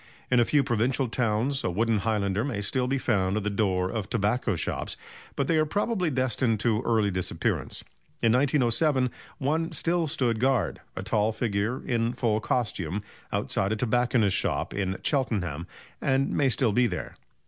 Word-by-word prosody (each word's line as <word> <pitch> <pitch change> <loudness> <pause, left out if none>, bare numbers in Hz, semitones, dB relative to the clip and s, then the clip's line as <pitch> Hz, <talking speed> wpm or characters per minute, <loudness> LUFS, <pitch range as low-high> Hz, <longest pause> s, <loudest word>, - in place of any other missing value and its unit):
In 125 - +5
a 120 - +5
few 145 +2 +3
provincial 125 +1 0
towns 120 +4 0
a - - 0
wooden 110 +4 +1
highlander 105 -1 0
may 120 -7 -2
still 125 +5 -1
be 135 +2 +1
found 100 -6 +1
at 105 - -2
the 105 - -1
door 95 -3 0
of 110 -4 -4
tobacco 110 -1 0
shops, 80 - -2 0.4
but 140 - 0
they 160 - +2
are 155 - +3
probably 200 0 0
destined 130 -4 0
to 110 -2 +2
early 110 -3 +2
disappearance. 90 -2 -2 0.4
In 115 - +5
1907 130 0 +2 0.3
one 160 +4 0
still 170 -1 +1
stood 120 -6 0
guard 130 +1 +1
a 95 - -4
tall 105 +1 +1
figure 110 +1 -2
in 115 -1 0
full 110 -4 0
costume 105 -5 -1 0.3
outside 95 +2 0
a - - 0
tobacconist's 120 -3 +2
shop - - -1
in 95 -1 -2
Cheltenham, 95 - -1 0.3
and 135 0 +1
may 140 -2 +2
still 125 -2 +2
be 120 +4 +3
there. 90 - -5
115 Hz, 170 wpm, -27 LUFS, 105-130 Hz, 0.4 s, In